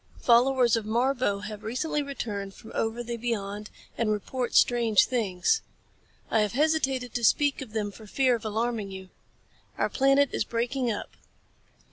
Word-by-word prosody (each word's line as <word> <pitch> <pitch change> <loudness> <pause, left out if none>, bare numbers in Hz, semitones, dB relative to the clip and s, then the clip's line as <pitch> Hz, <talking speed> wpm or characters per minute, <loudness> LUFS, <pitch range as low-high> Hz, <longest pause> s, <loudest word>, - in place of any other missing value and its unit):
Followers 245 0 +4
of 225 - -1
Marbo 235 -2 0
have 210 0 -7
recently 265 +7 -2
returned 210 -8 -5
from 220 - -13
over 225 +2 -1
the 235 0 -4
beyond 210 -3 -3 0.3
and 225 -2 +1
report 240 +4 -3
strange 230 -4 +4
things. 225 - 0 0.7
I 225 - +3
have 210 0 +1
hesitated 270 -4 +1
to 240 - -2
speak 285 +5 +3
of 235 -5 -9
them 210 -2 -2
for 215 +1 -13
fear 255 +3 +2
of 230 - -7
alarming 220 -1 -2
you. 190 -1 -9 0.7
Our - - +1
planet 275 +1 +3
is - - +1
breaking 240 +1 -1
up. 210 - -5
235 Hz, 155 wpm, -27 LUFS, 215-260 Hz, 0.7 s, Followers